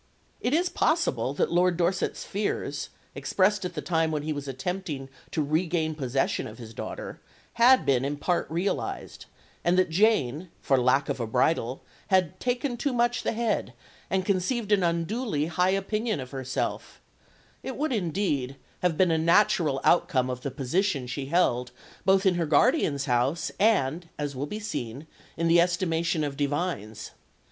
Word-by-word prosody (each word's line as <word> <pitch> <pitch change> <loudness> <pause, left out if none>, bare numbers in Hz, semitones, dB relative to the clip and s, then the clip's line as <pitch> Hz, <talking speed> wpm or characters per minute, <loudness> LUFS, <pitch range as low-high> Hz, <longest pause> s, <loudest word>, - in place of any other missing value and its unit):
It 245 - -1
is 350 +3 +2
possible 140 - 0
that - - +1
Lord 175 0 +3
Dorset's 175 +1 0
fears, 205 +1 -3 0.2
expressed 195 0 +1
at 180 -1 -5
the 150 - -4
time 165 -2 +1
when 150 -2 -2
he 155 0 -2
was 145 -1 -6
attempting 140 0 -4 0.2
to 155 - -1
regain 160 +1 0
possession 135 -3 -1
of 110 - -10
his 115 -2 -10
daughter, - - -7 0.4
had 255 +2 +7
been 130 -2 +2
in 145 +1 -2
part 175 +4 0
realised; 175 +5 -3 0.4
and 175 +1 +2
that 185 -3 +3
Jane, 175 - +2
"for 135 -2 +2
lack 130 +3 +3
of - - -2
a 115 - -2
bridle," 125 +1 0 0.2
had 185 -4 +2
"taken 245 0 -1
too 275 +2 -1
much 240 0 +1
the - - -1
head," 230 -2 -1 0.4
and 190 -1 0
conceived 205 +3 0
an 205 -2 +4
unduly 170 - 0
high 180 +3 +1
opinion 210 +2 -1
of 125 -1 -7
herself 130 -1 -4 0.6
it 265 - -6
would 300 -1 0
indeed 165 - -1 0.2
have 175 -3 0
been 185 -2 +4
a 160 - +2
natural 170 -4 +3
outcome 130 -7 +3
of 125 0 -5
the 140 - -3
position 140 +3 -1
she 130 +2 -4
held 125 -7 +2 0.4
both 190 +1 +4
in 190 - +5
her 170 -2 -1
guardian's 150 - +3
house 130 +5 0
and, 175 -6 +2
as 145 -2 -3
will 140 +3 -3
be 210 - -5
seen, 135 - -5 0.3
in 165 - +1
the 170 +1 +6
estimation 170 -2 0
of 145 -2 -3
divines. 140 - -3
165 Hz, 165 wpm, -27 LUFS, 140-195 Hz, 0.6 s, had